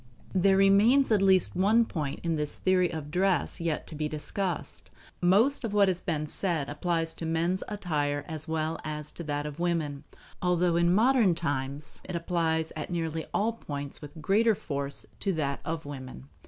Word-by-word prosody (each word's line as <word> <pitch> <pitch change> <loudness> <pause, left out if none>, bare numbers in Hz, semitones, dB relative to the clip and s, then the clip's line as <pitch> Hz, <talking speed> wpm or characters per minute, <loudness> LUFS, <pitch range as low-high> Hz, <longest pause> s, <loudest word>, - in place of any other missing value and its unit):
There 190 +1 +4
remains 210 +8 +5
at 210 -3 +4
least 190 -2 +4
one 215 +6 +4
point 150 -9 -4
in 165 -2 0
this 150 -1 -1
theory 185 -1 +2
of 150 -2 -6
dress 190 +1 +1
yet 165 -2 -1
to - - -9
be 155 0 -2
discussed. 150 - -3 0.3
Most 215 +11 +4
of 225 -3 -3
what 200 -2 +5
has 180 -1 -1
been 155 -4 -2
said 160 -3 0
applies 165 +2 -1
to - - -9
men's 170 +3 0
attire 145 -8 -2
as 155 0 -5
well 160 0 -2
as 150 -1 -5
to 170 - -8
that 145 0 -2
of 150 +1 -6
women; 160 -5 -1 0.4
although 180 -1 +2
in 170 0 +3
modern 220 -2 +4
times 145 -2 -3
it 180 - -6
applies 165 -2 0
at 155 - -5
nearly 165 -2 -3
all 225 +3 +1
points 145 -10 -6
with 150 +2 -10
greater 210 +7 +3
force 140 -4 -4
to 195 - 0
that 140 -4 -1
of 165 -1 -4
women. 130 -2 -8
165 Hz, 180 wpm, -28 LUFS, 150-190 Hz, 0.4 s, remains